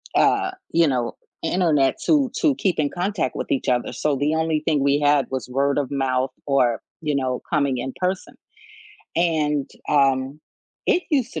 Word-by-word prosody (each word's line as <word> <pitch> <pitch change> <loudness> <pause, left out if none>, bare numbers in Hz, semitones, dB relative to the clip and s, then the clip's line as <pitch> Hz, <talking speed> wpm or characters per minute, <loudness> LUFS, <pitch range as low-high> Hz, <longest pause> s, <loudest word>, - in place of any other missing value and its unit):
uh, 385 -2 +3 0.2
you 165 -1 +4
know, 125 -3 -1 0.2
internet 160 -5 +2
to 280 -6 +3
to 300 -4 +3
keep 190 -9 0
in 145 -2 +2
contact 180 -6 -2
with - - -4
each 135 - 0
other, 125 -1 0
so 150 -2 0
the 150 +3 0
only 160 -1 0
thing 150 -4 +2
we 140 +1 +3
had 145 -3 +3
was 130 -1 -4
word 140 +2 +1
of 145 -2 -1
mouth 130 -1 0 0.2
or, 125 -5 +2 0.2
you 150 -2 -1
know, 130 -2 -1
coming 140 -4 +1
in 130 +1 -4
person. 185 0 -2 0.8
And, 150 -4 +1 0.2
um, 135 0 +2 0.5
it 360 - +3
used 260 -5 +1
to - - -3
145 Hz, 175 wpm, -22 LUFS, 135-170 Hz, 0.8 s, you